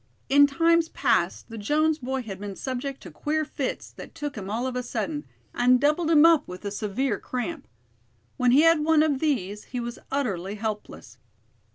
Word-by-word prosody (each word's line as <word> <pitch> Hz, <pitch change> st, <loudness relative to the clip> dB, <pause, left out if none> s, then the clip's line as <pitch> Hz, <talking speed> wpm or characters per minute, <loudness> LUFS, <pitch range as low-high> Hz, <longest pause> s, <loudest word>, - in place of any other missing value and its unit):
In 285 Hz, +1 st, +7 dB
times 330 Hz, +3 st, +2 dB
past -, -, 0 dB
the 225 Hz, -, -6 dB
Jones 305 Hz, +8 st, +1 dB
boy 260 Hz, 0 st, -3 dB
had 195 Hz, -4 st, -7 dB
been 200 Hz, -1 st, -6 dB
subject 265 Hz, +3 st, -4 dB
to -, -, -10 dB
queer 310 Hz, +1 st, -1 dB
fits 275 Hz, -3 st, -4 dB
that -, -, -12 dB
took 290 Hz, -1 st, -5 dB
him 195 Hz, -3 st, -6 dB
all 230 Hz, +4 st, -2 dB
of 260 Hz, -1 st, -3 dB
a 250 Hz, -, -1 dB
sudden, 295 Hz, +4 st, -4 dB, 0.3 s
and 250 Hz, +1 st, +4 dB
doubled 300 Hz, +4 st, +2 dB
him 315 Hz, -1 st, +6 dB
up 330 Hz, -3 st, +5 dB
with 180 Hz, +3 st, -9 dB
a 200 Hz, -, -2 dB
severe 210 Hz, +2 st, -2 dB
cramp. 270 Hz, +4 st, -5 dB, 0.7 s
When 250 Hz, -1 st, +2 dB
he 265 Hz, +5 st, +6 dB
had 330 Hz, -1 st, +5 dB
one 310 Hz, 0 st, +4 dB
of 290 Hz, -4 st, +1 dB
these, 210 Hz, -, -1 dB
he 250 Hz, -, -5 dB
was 240 Hz, 0 st, -5 dB
utterly 205 Hz, -9 st, -2 dB
helpless. 210 Hz, -, -6 dB
260 Hz, 190 wpm, -26 LUFS, 215-300 Hz, 0.7 s, In